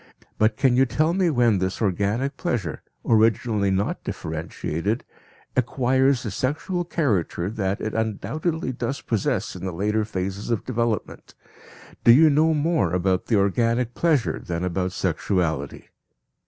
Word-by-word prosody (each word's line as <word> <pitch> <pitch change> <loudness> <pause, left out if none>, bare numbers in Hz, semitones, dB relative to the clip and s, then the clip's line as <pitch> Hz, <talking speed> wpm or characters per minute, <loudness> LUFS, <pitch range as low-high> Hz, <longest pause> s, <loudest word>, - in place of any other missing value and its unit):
But 110 0 +3
can 135 -3 +3
you 130 +1 +4
tell 155 +6 +1
me 185 -1 +2
when 120 - +3
this 95 0 -2
organic 105 +7 0
pleasure, 110 - -3 0.2
originally 110 -2 +2
not 95 +1 -1
differentiated, 80 +5 -3 0.5
acquires 130 +1 +2
the 110 - -4
sexual 155 - -2
character 105 - -1
that 100 -2 -2
it 110 - -3
undoubtedly 135 - -2
does 125 +2 -4
possess 110 -4 -1
in - - -8
the 95 - -2
later 105 +5 0
phases 95 0 -4
of 115 -3 -1
development? 115 -3 -3 0.7
Do 115 - +8
you 155 +5 +7
know 155 +2 +3
more 150 - +1
about 90 0 0
the 115 - +2
"organic 115 +4 +1
pleasure" 155 -8 +1
than 85 0 -3
about 90 0 -1
sexuality? 85 -5 -2
110 Hz, 140 wpm, -24 LUFS, 95-130 Hz, 0.7 s, Do